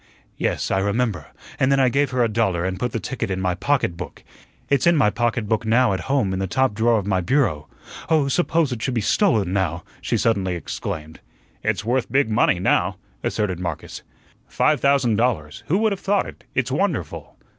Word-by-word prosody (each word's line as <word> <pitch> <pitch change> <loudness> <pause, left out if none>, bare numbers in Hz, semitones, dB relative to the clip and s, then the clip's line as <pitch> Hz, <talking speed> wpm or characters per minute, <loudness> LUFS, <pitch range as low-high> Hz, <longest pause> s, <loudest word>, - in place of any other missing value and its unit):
"Yes, - - -1
I 95 - +2
remember, 100 - -1 0.3
and 130 +1 +3
then 135 - +3
I 130 -1 +4
gave 140 +2 +1
her 125 -1 +1
a - - +3
dollar 105 -6 0
and 95 0 -3
put 125 +1 -1
the 115 - -2
ticket 125 +1 -4
in 95 -1 -2
my 90 -1 0
pocketbook. 90 -5 -2 0.4
It's 140 +4 +2
in 170 - +5
my 105 -7 +4
pocketbook 115 0 0
now 115 0 +3
at 95 - -2
home 130 -9 +1
in 95 - -2
the 95 - -1
top 130 +4 +1
drawer 115 +2 +2
of 100 - -2
my 95 -2 +1
bureau 85 - +1 0.4
oh, 155 -4 +3
suppose 160 0 +1
it 120 -3 -4
should 130 +2 -1
be 115 - +1
stolen 105 - +2
now," 90 -3 -1 0.2
she - - 0
suddenly 95 -5 +1
exclaimed. 80 -1 -6 0.4
"It's 100 - -1
worth 120 0 0
big 135 -3 +2
money 110 -4 +3
now," - - +1 0.2
asserted 95 -5 -1
Marcus. 85 -4 -5 0.5
"Five 150 -4 +1
thousand 135 -6 +3
dollars. 100 -11 -1
Who 180 - +2
would 220 0 +2
have 195 - -2
thought 200 0 +1
it? - - -11
It's 130 0 0
wonderful." 170 - -2
115 Hz, 200 wpm, -22 LUFS, 95-135 Hz, 0.5 s, in